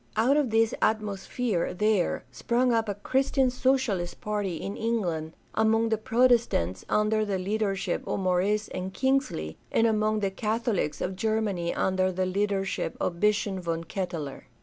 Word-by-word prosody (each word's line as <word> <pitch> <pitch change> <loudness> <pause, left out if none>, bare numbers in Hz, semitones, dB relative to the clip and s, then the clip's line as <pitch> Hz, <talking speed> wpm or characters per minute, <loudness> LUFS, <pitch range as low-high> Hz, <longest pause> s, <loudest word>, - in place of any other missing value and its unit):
Out 235 +6 +3
of 295 -4 +2
this 225 0 +3
atmosphere 215 -2 -1
there 210 -2 +1
sprang 245 +1 +1
up 225 -2 +1
a 200 - -1
Christian 265 +4 +1
Socialist 255 -9 0
party 205 -4 -2
in 195 +5 -5
England 175 -9 -1 0.2
among 225 +1 +2
the 220 - +1
Protestants 225 - +2
under 215 +1 +2
the 200 -2 -1
leadership 195 0 -1
of - - -1
Maurice 195 +3 +1
and 185 +1 -4
Kingsley, 255 - 0
and 225 - +3
among 215 -1 +2
the 195 -1 0
Catholics 215 -6 -1
of 185 - -2
Ger 220 +2 +1
many 185 -6 -1
under 185 0 +1
the 185 +1 -1
leadership 195 +1 -1
of 170 -1 -2
Bishop 205 -1 +1
von 165 -2 -2
Ketteler. 165 -5 -5
210 Hz, 150 wpm, -27 LUFS, 185-225 Hz, 0.2 s, Out